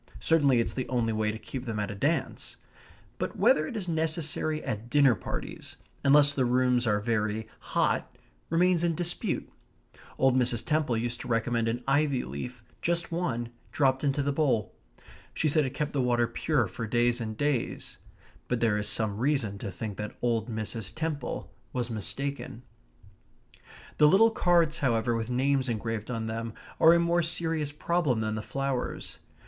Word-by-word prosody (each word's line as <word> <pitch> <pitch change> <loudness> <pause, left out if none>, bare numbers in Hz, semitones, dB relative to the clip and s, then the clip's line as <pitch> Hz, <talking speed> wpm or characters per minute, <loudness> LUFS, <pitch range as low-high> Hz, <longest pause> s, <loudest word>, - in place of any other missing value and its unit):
Certainly 145 -6 +4
it's 115 - 0
the 130 - -4
only 120 -3 0
way 110 0 0
to 110 - -6
keep 130 +3 -7
them 110 -3 -3
at 105 -1 -2
a - - -4
dance; 100 - -2 0.6
but - - -3
whether 155 +1 +4
it 225 - -5
is 190 -4 -4
necessary 160 -1 -1
at 120 -2 -4
dinner 140 -2 +5
parties, 90 -4 -6 0.3
unless 145 +1 +6
the 135 - +1
rooms 125 0 +2
are 105 -1 +2
very 110 0 -1
hot, - - -1 0.3
remains 175 +1 +3
in 170 -1 +1
dispute. 175 +1 -2 0.7
Old 130 -1 +3
Mrs. 120 -2 +2
Temple 150 -6 +1
used 120 +1 -2
to - - -7
recommend 115 0 0
an 120 +2 -2
ivy 140 -1 +2
leaf 110 - -7 0.2
just 170 0 0
one 125 -9 -2 0.2
dropped 135 -1 +2
into 140 0 +1
the 145 - 0
bowl. 135 - +1 0.6
She 155 - +1
said 150 -1 +3
it 130 - -7
kept 150 -1 -2
the 140 - +1
water 120 -1 +2
pure 125 +2 0
for 110 +3 -5
days 120 +1 +2
and 110 -1 -4
days. 145 -3 -2 0.5
But 125 - 0
there 110 -3 +2
is 105 0 -2
some 105 -2 -1
reason 125 -7 0
to 100 - -4
think 105 +2 -6
that 105 0 -6
old 115 -2 0
Mrs. 110 -2 -4
Temple 155 -4 -4 0.2
was 120 -2 -2
mistaken. 125 +3 -3 1.3
The 150 - +7
little 220 +8 +6
cards, 170 -6 +2
however, 120 -3 +1
with 115 0 -3
names 130 +1 +1
engraved 115 -1 -3
on 115 -2 -2
them, 115 0 -4 0.3
are 165 +1 +8
a - - +4
more 170 0 +2
serious 165 -3 -1
problem 150 -5 0
than 110 0 -1
the 110 - -3
flowers. 135 +1 -3
125 Hz, 170 wpm, -28 LUFS, 115-150 Hz, 1.3 s, are